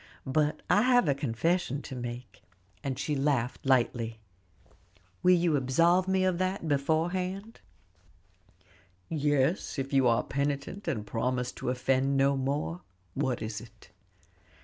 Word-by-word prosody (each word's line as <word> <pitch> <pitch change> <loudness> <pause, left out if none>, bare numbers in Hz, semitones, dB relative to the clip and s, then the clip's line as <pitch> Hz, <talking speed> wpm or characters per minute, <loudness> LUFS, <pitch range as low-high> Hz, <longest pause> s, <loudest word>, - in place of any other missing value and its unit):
But 150 +3 0
I 200 +4 +4
have 245 -4 +4
a 140 - +4
confession 140 +3 -1
to 135 - -7
make," 120 0 -7 0.4
and 135 -3 -2
she 150 - -1
laughed 135 -3 0
lightly. 120 -3 +1 1.0
"Will 180 0 +6
you 170 -3 +2
absolve 165 +8 +3
me 190 0 +2
beforehand?" 180 +3 -1 1.5
"Yes, 145 +2 0
if 135 +1 -3
you 135 -2 +4
are 115 -1 +3
penitent, 140 +7 -3
and 115 -11 -2
promise 125 +3 -1
to - - -5
offend 130 +2 +1
no 140 +1 +3
more. 130 - -2 0.3
What 125 0 -1
is 110 0 -4
it?" 115 - -16
140 Hz, 125 wpm, -29 LUFS, 125-170 Hz, 1.5 s, Will